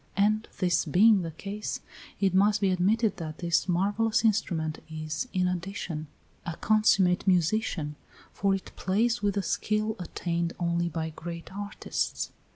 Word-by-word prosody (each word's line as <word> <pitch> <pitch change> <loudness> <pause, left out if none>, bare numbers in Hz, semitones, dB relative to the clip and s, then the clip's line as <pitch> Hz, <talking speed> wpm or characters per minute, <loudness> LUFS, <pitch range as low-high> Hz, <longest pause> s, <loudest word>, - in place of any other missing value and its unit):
And 215 +2 +2
this 180 -2 +2
being 200 +6 +5
the 165 - -3
case, 200 +6 -5 0.4
it 195 -2 +2
must 205 +2 +4
be 195 -2 +2
admitted 205 +5 +2
that 155 -2 -6
this 170 +1 +1
marvellous 205 +6 +2
instrument 165 -7 0
is, 155 +6 -4
in 185 -1 +1
addition, 175 -3 -4 0.4
a 170 - -4
consummate 200 -4 +3
musician, 175 -4 +1 0.4
for 195 0 +2
it 195 - -7
plays 230 +5 +1
with 205 -1 +1
the 200 - 0
skill 215 +2 0
attained 170 -1 -2
only 170 0 0
by 160 0 -3
great 170 +1 -7
artists. 205 0 -3
185 Hz, 145 wpm, -28 LUFS, 170-210 Hz, 0.4 s, being